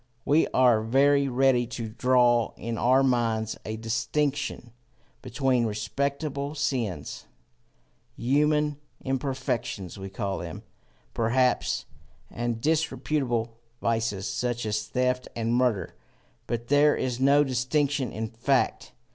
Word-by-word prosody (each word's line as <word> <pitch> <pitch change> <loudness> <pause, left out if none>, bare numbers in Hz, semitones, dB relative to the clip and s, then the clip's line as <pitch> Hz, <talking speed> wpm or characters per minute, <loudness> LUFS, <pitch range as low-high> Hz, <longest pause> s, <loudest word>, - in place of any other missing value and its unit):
We 155 +3 +4
are 125 -4 +4
very 140 +5 +3
ready 130 -1 +2
to 115 -2 -4
draw 120 0 +3
in 115 0 -4
our 130 +4 +3
minds 115 -4 +1
a 110 0 -4
distinction 120 +4 -2 0.5
between 125 -1 +1
respectable 140 +6 -3
sins 120 - -3 0.9
human 150 +3 +1 0.2
imperfections 130 - -3
we 95 0 -6
call 100 -1 -3
them, 85 -3 -7 0.5
perhaps 115 - +1 0.5
and 120 -1 -2
disreputable 135 -6 -1 0.2
vices, 115 -4 -1
such 120 -1 -2
as 105 0 -2
theft 125 +2 0
and 115 0 -1
murder; 120 -8 +1 0.5
but 120 0 -3
there 145 +1 +5
is 125 -1 -2
no 140 +2 +5
such 140 - -4
distinction 135 +1 0
in 110 +1 -3
fact. 120 +4 0
125 Hz, 115 wpm, -27 LUFS, 115-140 Hz, 0.9 s, there